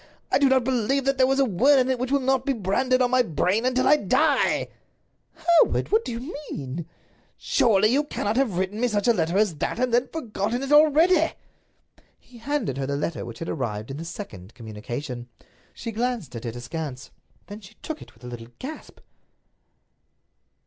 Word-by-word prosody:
I - - +4
do 280 -1 +4
not 260 -1 +3
believe 260 +2 0
that 275 0 +1
there 260 0 +5
is 270 - +1
a 275 - +4
word 255 +7 +4
in 255 -1 +3
it 255 - -1
which 255 +1 -2
will 280 -1 +2
not 260 0 +1
be 275 - 0
branded 255 +5 +1
on 245 - +1
my 255 0 +5
brain 200 - 0
until 255 0 +1
I 300 - +6
die." 295 - +2 0.7
"Hereward! 330 +1 +3
What 440 +2 +3
do - - -5
you 245 +8 -6
mean?" 145 +4 -5 0.5
"Surely 215 -3 +3
you 275 +5 +2
cannot 220 -7 -2
have 245 -9 +1
written 190 +3 -2
me 245 - +3
such 205 -2 -1
a 235 - +6
letter 170 -2 0
as 200 -7 +2
that, - - -2
and 250 0 0
then 240 - +5
have - - -26
forgotten 240 -4 -3
it 275 - -4
already?" 315 +3 +5 0.8
He 245 -1 -17
handed 230 - -2
her 135 - -2
the 140 0 -1
letter 155 +2 -3
which 120 -1 -8
had 165 - -5
arrived 110 -5 -3
in 135 - -6
the 160 - -6
second 120 - -9
communication. 120 +3 -7 0.4
She 230 - -6
glanced 225 - -3
at 115 - -7
it, 115 0 -4
askance. 130 +2 -6 0.3
Then 205 +2 -10
she 210 +2 -15
took 315 -1 -5
it - - -14
with - - -23
a - - -8
little 120 -2 -8
gasp. 305 +4 -9
225 Hz, 200 wpm, -24 LUFS, -, 0.8 s, I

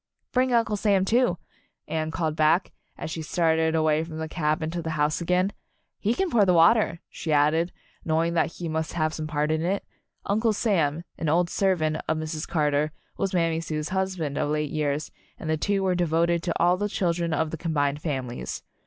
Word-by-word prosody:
"Bring 255 0 +2
Uncle 230 -3 +2
Sam, 200 -2 +2
too," 235 -3 +2 0.5
Anne 155 -1 -2
called 160 -1 -1
back, 160 +4 +3 0.3
as 160 - -5
she 160 - -4
started 160 0 +1
away 155 0 +2
from 160 -1 -7
the 160 0 -3
cabin 155 0 -1
to 170 0 -3
the 160 - -4
house 150 +3 +1
again. 180 +3 +1 0.5
"He 220 +4 +1
can 380 -3 0
pour 220 -3 +5
the 180 -2 +4
water," 170 0 +4
she 160 - -5
added, 155 +4 +3 0.3
knowing 165 +1 +1
that 165 -1 +1
he 175 - -5
must 160 0 -2
have 155 -2 0
some 155 -1 -4
part 150 0 0
in 155 0 +1
it. 190 +4 -1 0.4
Uncle 220 +2 +2
Sam, 170 -8 +1 0.2
an 160 - 0
old 170 +2 +2
servant 165 -6 +1
of 160 - +1
Mrs. 155 0 -4
Carter, 150 -1 +1 0.2
was 195 - -1
Mammy 165 -2 +1
Sue's 155 -1 -3
husband 185 -6 -2
of - - 0
late 150 -1 -1
years, 150 -1 -1 0.3
and - - -7
the - - +3
two 195 +5 0
were 185 -1 +2
devoted 170 0 +1
to 170 - -2
all 175 +1 +4
the 205 +2 -1
children 170 -3 0
of 160 -1 0
the - - -2
combined 145 -3 0
families. 130 -6 -4
165 Hz, 195 wpm, -26 LUFS, 155-180 Hz, 0.5 s, pour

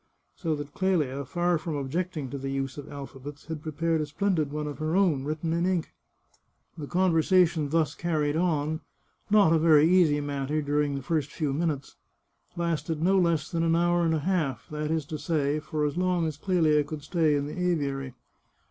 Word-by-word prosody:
So 160 -3 -1
that 145 -1 -7
Clelia, 155 -8 0
far 175 +3 0
from 160 -1 -4
objecting 150 +1 -3
to 140 - -4
the 135 +1 -4
use 135 -1 -3
of 145 - -9
alphabets, 140 0 -9
had 160 -2 -5
prepared 160 +1 -1
a 150 - -3
splendid 160 -2 0
one 150 0 -3
of 150 0 -6
her 155 +2 -1
own, 170 -9 +2
written 155 +2 -2
in 170 +1 0
ink. 180 -4 -1 0.8
The 150 -4 -7
conversation 175 -3 +3
thus 155 -1 +1
carried 155 -4 -1
on 160 -2 0 0.2
— - - -41
not 205 -6 +5
a 165 - +4
very 155 -1 +6
easy 170 -5 +4
matter 145 +1 -2
during 145 -1 0
the 135 - -5
first 150 -1 -1
few 150 -4 -2
minutes 150 -2 -2 0.3
— - - -41
lasted 165 -2 -2
no 190 +4 +3
less 165 -4 +1
than 170 -2 0
an 165 0 +2
hour 175 0 +2
and 165 -1 +2
a - - 0
half; 150 - -1
that 150 0 -3
is 160 -2 0
to 155 +1 -6
say, 150 -2 0
for 150 -1 -2
as 150 +3 -2
long 180 -2 +1
as 155 -2 -2
Clelia 155 -2 +2
could 150 0 -7
stay 155 -1 +2
in 140 0 0
the 150 +5 -6
aviary. 140 -7 -1
155 Hz, 200 wpm, -27 LUFS, 145-170 Hz, 0.8 s, very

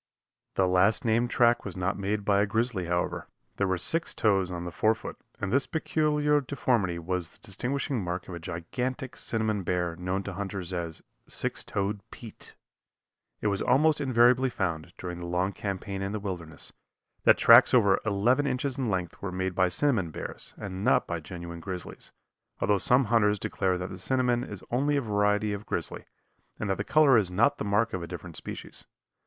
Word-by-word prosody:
The 95 - +3
last 95 +8 +3
named 115 +2 +2
track 120 +1 +3
was 95 -2 -6
not 95 +2 0
made 100 +1 -2
by 100 -1 +4
a 105 - +2
grizzly 110 -3 0
however. 85 +1 -1 0.3
There 100 - +1
were 95 -1 +1
six 160 - 0
toes 95 -4 +2
on 85 -1 -4
the 85 - -5
forefoot, 110 +6 0 0.2
and 100 +1 -2
this 140 0 +2
peculiar 150 -2 +1
deformity 120 -9 0
was 85 0 -2
the - - -18
distinguishing 130 +3 -3
mark 90 0 -4
of 90 - -7
a 85 - -5
gigantic 125 +10 -4
cinnamon 110 -2 -1
bear 90 -2 -1
known 90 +3 -2
to 100 - -5
hunters 95 -2 -5
as 85 -2 -4 0.2
"Six - - -2
Toed 100 +1 -2
Pete." 115 -3 -10 0.9
It - - -6
was 100 -1 0
almost 150 +4 +3
invariably 125 0 +4
found, 85 -7 -3
during 90 -1 -6
the 85 - -6
long 90 +3 0
campaign 100 0 -4
in 95 +1 -3
the 110 - -2
wilderness, 90 -5 -5 0.5
that - - +6
tracks 115 +2 +8
over 100 -7 +5
eleven 120 +7 +2
inches 130 +1 -2
in 125 -4 0
length 90 -3 -3
were 100 - -3
made 95 0 -2
by 90 0 +3
cinnamon 105 - +1
bears, - - -7
and 95 -1 -6
not 125 - +3
by 85 -1 -3
genuine 85 +1 -8
grizzlies, 90 +1 -5 0.5
although 100 -1 +2
some 125 +7 +4
hunters 105 -2 +3
declare 95 -2 -1
that 90 0 -5
the 95 - -7
cinnamon 125 +2 +1
is 105 -6 -8
only 145 +4 +2
a - - +1
variety 105 -1 +1
of 100 +1 -6
grizzly, - - -2 0.5
and 105 -2 -1
that 95 - 0
the 100 - -2
color 140 -2 +5
is 95 -4 0
not 100 +6 +2
the - - -1
mark 105 +3 +1
of 95 - -2
a 85 - -5
different - - -8
species. - - -7
100 Hz, 190 wpm, -28 LUFS, 90-120 Hz, 0.9 s, tracks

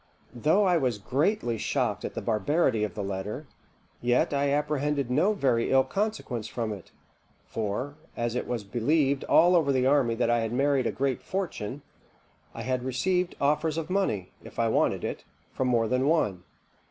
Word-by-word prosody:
"Though 155 - +3
I 180 -3 +3
was 125 -7 0
greatly 125 - 0
shocked - - -1
at - - -5
the - - -4
barbarity 115 - +1
of 105 -5 -3
the 105 - -3
letter, 100 +8 -4 0.6
yet 120 +4 +2
I 140 0 +1
apprehended 145 -2 0
no 175 +11 +3
very 125 - +1
ill 135 0 +5
consequence 135 - -3
from 115 -2 -3
it; 100 -4 -11 0.5
for, 115 +7 -3 0.2
as 120 -1 -1
it 125 - -3
was 120 -4 -2
believed 135 +6 +1
all 175 +2 +5
over 155 -5 +3
the 130 -1 +2
army 130 -4 +3
that 120 0 +1
I 120 - +3
had 115 0 -2
married 135 -1 +2
a - - 0
great 135 -2 -1
fortune, 145 - -4 0.7
I - - -5
had 130 -1 -1
received 180 +8 0
offers 150 +2 +1
of 165 +2 -4
money, 110 - 0
if - - -13
I 115 -1 +2
wanted - - +1
it, - - -4 0.3
from 130 - -1
more 115 -2 +2
than 125 +3 +1
one. 105 - +1
130 Hz, 175 wpm, -27 LUFS, 115-150 Hz, 0.7 s, ill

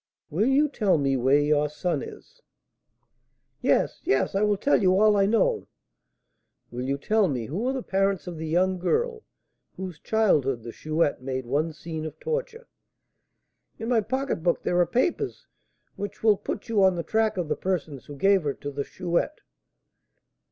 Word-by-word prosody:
"Will 195 +10 +1
you 280 +3 +4
tell 210 - +1
me 135 -2 +1
where 130 +3 +3
your 150 0 +2
son 150 0 -2
is?" - - -11 1.2
"Yes, - - +1
yes, 135 - +1
I 195 - +1
will 210 -1 +2
tell 280 +6 +2
you 185 0 +4
all 215 0 +5
I 195 -1 +3
know." 430 - +1 1.0
"Will 125 - -5
you 140 +1 -1
tell 215 +7 +2
me 125 -7 -2
who 190 - -3
are 265 - +1
the 260 -2 -3
parents 195 -3 0
of 175 -2 -6
the 160 - -4
young 185 +3 +1
girl 455 - 0 0.6
whose 185 -4 -6
childhood 145 - +1
the 115 - -7
Chouette 155 +1 -1
made 130 -1 -4
one 150 +6 0
scene 160 +1 -6
of 155 - -10
torture?" 475 0 -4 1.1
"In 225 +1 -5
my 235 -3 +3
pocketbook 215 -7 -1
there 180 - +1
are 175 - +4
papers 335 - -1 0.5
which 205 +1 -6
will 215 -2 +6
put 205 +3 -6
you 215 -4 +2
on 190 -1 +4
the 170 - -3
track 220 0 +1
of 175 -3 -1
the - - 0
persons 160 -7 -3
who 145 - -8
gave 195 +6 +3
her 145 -3 -2
to 145 - -6
the 140 0 -3
Chouette." 180 - -2
185 Hz, 175 wpm, -26 LUFS, 150-220 Hz, 1.2 s, will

